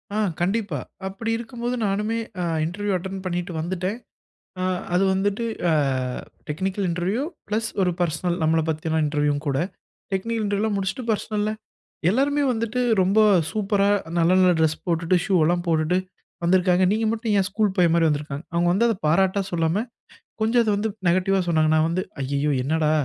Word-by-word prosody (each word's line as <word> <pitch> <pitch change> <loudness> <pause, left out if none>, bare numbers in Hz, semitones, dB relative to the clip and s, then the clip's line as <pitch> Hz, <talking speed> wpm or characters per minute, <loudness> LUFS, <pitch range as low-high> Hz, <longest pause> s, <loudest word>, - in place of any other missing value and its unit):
ஆ, - - 0 0.2
கண்டிப்பா. 195 - 0 0.3
அப்டி 225 +4 -4
இருக்கும்போது 240 +1 -4
நானுமே 210 +3 0 0.2
அ - - -1 0.2
இன்டெர்வியூ 200 +4 -2
அட்டென்ட் 190 +1 -6
பண்ணிட்டு 180 0 -2
வந்துட்டேன். 185 +5 -2 0.6
அ - - -1 0.3
அது 185 - +3
வந்துட்டு, 205 +4 0 0.3
அ - - +3 0.8
டெக்னிக்கல் 190 +5 -2
இன்டெர்வியூ 180 +8 -1 0.3
ப்ளஸ் 220 +2 -1
ஒரு 180 - +2
பெர்சனல் 175 +1 0
நம்மள 160 +1 +3
பத்தியெல்லாம் 160 0 0
இன்டெர்வியூவும் 145 0 0
கூட. 135 - +1 0.5
டெக்னிக்கல் 225 +4 -1
இன்டெர்வியூ 205 0 0
எல்லாம் 220 -2 0
முடிச்சுட்டு 195 +7 -3
பெர்சனல்ல 210 0 -1 0.6
எல்லாருமே 285 +6 +2
வந்துட்டு 230 +1 -2 0.2
ரொம்ப 195 +4 +3 0.3
சூப்பரா, 200 -1 +1 0.3
நல்ல, 165 0 +3
நல்ல 185 -1 +5
டிரெஸ் 160 0 +2
போட்டுட்டு, 165 +1 +1
ஷூ 195 - -1
எல்லாம் 175 +2 +1
போட்டுட்டு 160 +2 +2 0.5
வந்திருக்காங்க. 180 +1 +3
நீங்க 220 +1 +1
மட்டும் 225 -1 -1
ஏன் 190 - +1
ஸ்கூல் 205 -1 0
பையன் 170 -2 +4
மாரி 165 -1 +3
வந்திருக்கீங்க? 145 0 -3
அவங்க 170 +1 +2
வந்து 215 +6 +3
அத 225 - +1
பாராட்டா 190 +5 +3
சொல்லாம, 170 +5 +1 0.6
கொஞ்சம் 230 +2 +3
அத 215 - 0
வந்து 220 +2 -1 0.2
நெகட்டிவ்வா 185 +2 +2
சொன்னாங்க. 155 -2 +3
நா - - +4
வந்து, 185 +2 -1 0.2
ஐயையோ! 140 +2 0
என்னடா, 155 +1 +1
185 Hz, 160 wpm, -23 LUFS, 165-210 Hz, 0.8 s, நல்ல